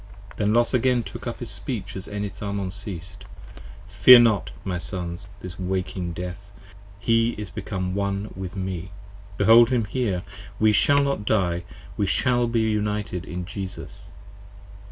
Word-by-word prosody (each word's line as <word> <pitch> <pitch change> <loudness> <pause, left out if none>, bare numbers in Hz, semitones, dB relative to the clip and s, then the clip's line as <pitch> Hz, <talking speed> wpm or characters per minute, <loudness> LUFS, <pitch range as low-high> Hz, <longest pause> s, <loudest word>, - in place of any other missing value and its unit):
Then 105 0 +1
Los 120 +2 +3
again 125 -1 +2
took - - -8
up - - -5
his - - -4
speech - - -3
as 95 - -6
Enitharmon 100 -1 -4
ceas't. 100 -1 -5 0.7
Fear 105 +5 +9
not, 110 -7 +2
my 90 -2 -2
Sons, 90 +1 -2
this 90 0 -8
Waking 90 -1 -2
Death, 90 +4 -7 0.5
he 115 +2 +2
is 105 -4 -6
become 95 -3 -4
One 100 +1 -2
with 95 +1 -6
me. 95 -2 -4 0.5
Behold 115 +3 +7
him 120 -4 +1
here! 105 -5 -1 0.4
We 110 0 +5
shall 140 +7 +4
not 140 -6 -1
Die! 90 -5 +1 0.3
we 100 - +1
shall 120 +3 +2
be 115 -1 +1
united 105 -4 -1
in 90 0 -5
Jesus. 100 0 -7
100 Hz, 145 wpm, -24 LUFS, 95-110 Hz, 0.7 s, Fear